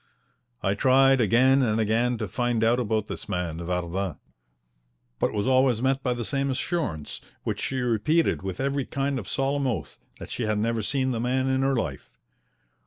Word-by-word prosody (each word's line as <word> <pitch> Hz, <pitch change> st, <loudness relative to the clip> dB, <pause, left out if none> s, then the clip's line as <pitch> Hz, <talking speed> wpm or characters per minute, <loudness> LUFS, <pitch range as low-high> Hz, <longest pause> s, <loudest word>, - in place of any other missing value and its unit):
I 95 Hz, -, +2 dB
tried 135 Hz, +4 st, +4 dB
again 130 Hz, +5 st, +4 dB
and 110 Hz, -3 st, +1 dB
again 115 Hz, +3 st, +1 dB
to 110 Hz, -1 st, -3 dB
find 120 Hz, +2 st, 0 dB
out 115 Hz, +2 st, +3 dB
about 110 Hz, -3 st, 0 dB
this -, -, -7 dB
man 85 Hz, -3 st, -2 dB
Vardin, 90 Hz, 0 st, -2 dB, 1.0 s
but -, -, +1 dB
was 105 Hz, +2 st, -1 dB
always 130 Hz, -3 st, +3 dB
met 135 Hz, +2 st, +1 dB
by 125 Hz, -2 st, 0 dB
the 120 Hz, -1 st, -4 dB
same 140 Hz, +1 st, -1 dB
assurance, 130 Hz, -, -3 dB, 0.2 s
which -, -, -3 dB
she 130 Hz, -1 st, -2 dB
repeated 125 Hz, +8 st, +1 dB
with 95 Hz, -1 st, -5 dB
every 140 Hz, 0 st, -1 dB
kind 140 Hz, -1 st, -1 dB
of 105 Hz, -, -8 dB
solemn 135 Hz, 0 st, 0 dB
oath, 100 Hz, -, -4 dB, 0.2 s
that -, -, -9 dB
she 115 Hz, -, -2 dB
had 110 Hz, -1 st, 0 dB
never 115 Hz, +1 st, 0 dB
seen 130 Hz, +5 st, 0 dB
the 115 Hz, -, -2 dB
man 130 Hz, +2 st, 0 dB
in 130 Hz, 0 st, +1 dB
her 135 Hz, 0 st, +2 dB
life. 80 Hz, -, -3 dB
120 Hz, 180 wpm, -26 LUFS, 105-135 Hz, 1.0 s, tried